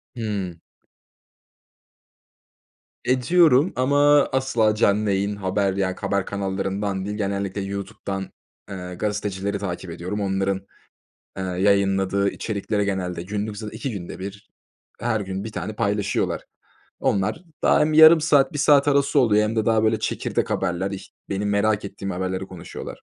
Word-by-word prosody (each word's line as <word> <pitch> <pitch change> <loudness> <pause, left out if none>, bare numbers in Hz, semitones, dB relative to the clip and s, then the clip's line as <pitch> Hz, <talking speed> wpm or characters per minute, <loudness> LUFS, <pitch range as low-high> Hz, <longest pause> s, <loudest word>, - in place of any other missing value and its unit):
Hımm. 100 -7 -4 2.5
Ediyorum 140 +4 +4
ama 145 +3 +4
asla 120 -5 +2
canlı 105 -1 +2
yayın 100 +1 0
haber, 95 0 0
yani, 95 -1 -1
haber 100 -1 -1
kanallarından 95 0 -2
değil, 105 +1 -4
genellikle 100 -1 -2
YouTube'dan, 100 0 -5 0.4
ııı, 90 -2 -6
gazetecileri 100 -1 -2
takip 90 -2 -5
ediyorum. 90 +5 -4
Onların, 95 0 0 0.8
ııı, 90 -1 -3
yayınladığı 100 0 +2
içerikleri 105 -1 -2
genelde 90 -3 -2
günlük 105 +2 -4
zaten 105 -1 -7
2 135 - -3
günde 95 -4 -7
1 100 +2 -8 0.5
her 115 -3 0
gün 95 +1 -4
1 110 - -6
tane 110 - -4
paylaşıyorlar. 100 -2 -1 0.6
Onlar 100 - 0 0.2
daha - - +4
hem 155 +1 +2
yarım 160 +1 +9
saat 150 0 +3
1 145 - -4
saat 145 0 +5
arası 140 0 +3
oluyor 105 -3 +4
hem 115 - -3
de 110 - +1
daha 110 -1 +3
böyle 110 0 +2
çekirdek - - -2
haberler, 90 +2 -1
ih 100 - -6 0.2
benim 100 +1 -1
merak 105 0 +1
ettiğim 100 0 -5
haberleri 95 +1 -3
konuşuyorlar. 90 -3 -9
100 Hz, 135 wpm, -23 LUFS, 95-110 Hz, 2.5 s, yarım